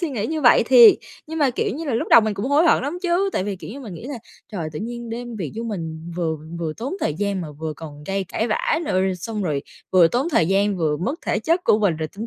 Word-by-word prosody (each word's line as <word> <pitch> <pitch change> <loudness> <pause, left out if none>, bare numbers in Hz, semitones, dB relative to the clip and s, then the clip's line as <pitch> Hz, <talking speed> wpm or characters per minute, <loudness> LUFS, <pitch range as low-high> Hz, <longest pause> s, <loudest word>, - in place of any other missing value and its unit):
suy 340 -4 -1
nghĩ 220 -5 -2
như 315 0 -2
vậy 245 -5 +6
thiệt, 240 -4 +9 0.3
nhưng 320 +1 -5
mà, 285 -4 +3
kiểu 245 - -2
như 325 +3 -5
là, 270 -6 -1
lúc - - -1
đầu 235 - +8
mình 215 -1 -1
cũng 200 +6 -3
hối 290 +4 +3
hận 300 - +4
lắm 300 +6 -3
chứ. 370 +2 +1
Tại 185 - -1
vì, 200 -2 -3
kiểu 190 - -9
như, 275 +5 -8
mình 210 -9 -8
nghĩ 230 - -9
là 275 -4 -5 0.3
trời, 170 -6 -3
tự 150 - -5
nhiên 235 +1 -6
đem 240 0 -6
việc 170 -8 -5
vô 230 - -3
mình, 165 -6 -5
vừa 160 -3 -1 0.2
vừa 160 -2 -3
tốn 265 +10 -4
thời 150 - 0
gian 200 +2 -2
mà 155 -4 -6
vừa 155 +1 -5
còn 150 -2 -10
gây 195 0 -2
cãi 220 +5 -2
vã 260 +8 +1
nữa, - - -2
rồi 190 0 +1
xong 210 +3 -4
rồi 150 -5 -1 0.3
vừa 175 -3 +6
tốn 260 - 0
thời 165 - +3
gian, 200 +1 +2
vừa 155 -4 0
mất 210 - -2
thể - - +1
chất 335 +3 0
của 210 - +4
mình 190 -7 +1
rồi 155 -1 -3
tinh 225 - -5
210 Hz, 290 wpm, -22 LUFS, 170-255 Hz, 0.3 s, thiệt